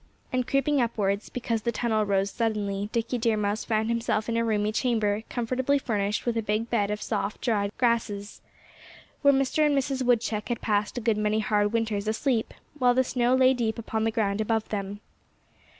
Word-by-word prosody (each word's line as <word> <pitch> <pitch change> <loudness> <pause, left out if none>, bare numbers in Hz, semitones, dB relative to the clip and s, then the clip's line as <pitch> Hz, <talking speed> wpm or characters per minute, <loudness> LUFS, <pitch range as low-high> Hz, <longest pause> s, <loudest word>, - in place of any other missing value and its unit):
And 255 -1 0
creeping 275 0 +2
upwards, 205 -3 -1
because 230 -2 -2
the 235 - 0
tunnel 220 -2 0
rose 195 0 +1
suddenly, 205 -3 -1
Dickie 235 +1 -1
Deer 225 -1 +1
Mouse 205 +1 -1
found 220 -1 0
himself 230 -2 0
in 230 - -1
a 230 - +2
roomy 215 -2 +1
chamber, 215 -3 0
comfortably 255 +3 0
furnished 210 -5 -1
with 240 -1 0
a 225 - +1
big 215 +2 -2
bed 205 -4 +1
of 210 0 -3
soft, 210 -1 -2
dried 205 -4 0
grasses, 225 -4 -1 0.8
where 280 - +6
Mr. 275 +3 +2
and 295 -2 +3
Mrs. 270 0 -1
Woodchuck 230 -3 +1
had 240 - -1
passed 210 +2 0
a - - -2
good 220 -1 +1
many 210 0 +1
hard 210 -1 +1
winters 220 -3 -1
asleep, 225 +1 0 0.3
while 245 -1 +4
the 260 - +4
snow 250 0 +1
lay 260 0 +5
deep 230 -3 -1
upon 220 -1 -2
the 225 - +2
ground 215 -2 0
above 220 0 0
them. 200 0 -4
225 Hz, 190 wpm, -27 LUFS, 210-245 Hz, 0.8 s, where